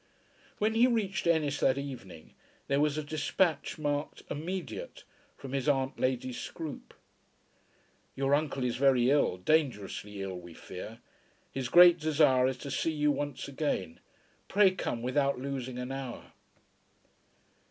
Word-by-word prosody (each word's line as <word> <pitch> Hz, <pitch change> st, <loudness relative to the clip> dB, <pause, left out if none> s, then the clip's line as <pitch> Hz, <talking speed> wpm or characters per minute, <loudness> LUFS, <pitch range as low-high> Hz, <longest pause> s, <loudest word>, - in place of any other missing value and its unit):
When 215 Hz, +1 st, +1 dB
he 235 Hz, +3 st, +5 dB
reached 205 Hz, -7 st, 0 dB
Ennis 155 Hz, -4 st, +2 dB
that 130 Hz, 0 st, +3 dB
evening 120 Hz, -, -8 dB, 0.3 s
there 140 Hz, 0 st, +2 dB
was 150 Hz, 0 st, +2 dB
a 155 Hz, -, -2 dB
despatch 155 Hz, +2 st, 0 dB
marked 145 Hz, -1 st, -2 dB
"Immediate," 185 Hz, -, -5 dB, 0.3 s
from 135 Hz, -1 st, -8 dB
his 135 Hz, +1 st, 0 dB
aunt 135 Hz, -2 st, 0 dB
Lady 130 Hz, 0 st, 0 dB
Scroope. 155 Hz, +4 st, -7 dB, 1.2 s
"Your 135 Hz, +1 st, +1 dB
uncle 145 Hz, -3 st, 0 dB
is 125 Hz, -1 st, -1 dB
very 130 Hz, -2 st, +4 dB
ill; 145 Hz, -10 st, +2 dB
dangerously 105 Hz, -, -1 dB
ill, 95 Hz, -2 st, -5 dB
we 85 Hz, -2 st, -12 dB
fear. -, -, -9 dB, 0.5 s
His 130 Hz, -2 st, -3 dB
great 175 Hz, +3 st, +8 dB
desire 150 Hz, -5 st, +4 dB
is 130 Hz, -1 st, -2 dB
to 140 Hz, -, -4 dB
see 160 Hz, +4 st, 0 dB
you 150 Hz, -1 st, +2 dB
once 145 Hz, -1 st, -3 dB
again. 135 Hz, -, -2 dB, 0.5 s
Pray 200 Hz, -1 st, +5 dB
come 120 Hz, -10 st, -3 dB
without 140 Hz, +2 st, +1 dB
losing 130 Hz, -1 st, -4 dB
an 125 Hz, +1 st, -4 dB
hour." 135 Hz, -3 st, -7 dB
140 Hz, 140 wpm, -30 LUFS, 130-155 Hz, 1.2 s, great